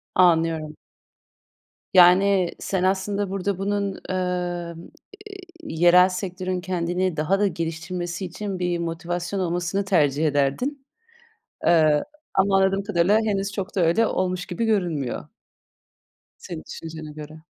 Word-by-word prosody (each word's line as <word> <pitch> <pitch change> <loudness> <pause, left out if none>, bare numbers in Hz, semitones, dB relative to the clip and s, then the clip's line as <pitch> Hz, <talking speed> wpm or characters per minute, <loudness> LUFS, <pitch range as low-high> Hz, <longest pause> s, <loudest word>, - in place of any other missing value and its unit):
Anlıyorum. 165 -3 +3 1.2
Yani, 185 0 +5
sen 190 -2 -2
aslında 195 +1 0
burada 195 0 -2
bunun, 200 0 -2
emm, 175 -2 -3 0.5
eee, 395 - -9 0.3
yerel 180 - +5
sektörün 185 0 -3
kendini 180 -1 -1
daha 170 +6 +1
da 205 - +3
geliştirmesi 170 +1 -4
için 190 +1 -5
bir 175 -1 -1
motivasyon 175 +3 -3
olmasını 175 +2 -1
tercih 155 -5 +2
ederdin. 150 - -1 0.8
Eee, 155 -3 +4 0.3
ama 195 0 +3
anladığım 195 +1 +2
kadarıyla 200 +1 +2
henüz 200 -1 -1
çok 200 -1 -5
da - - +2
öyle 175 +7 +3
olmuş 185 -1 -1
gibi 180 +6 -3
görünmüyor. 175 - -1 1.1
Senin 80 - -7
düşüncene 160 -1 -8
göre. 155 +1 -10
180 Hz, 115 wpm, -24 LUFS, 165-195 Hz, 1.2 s, Yani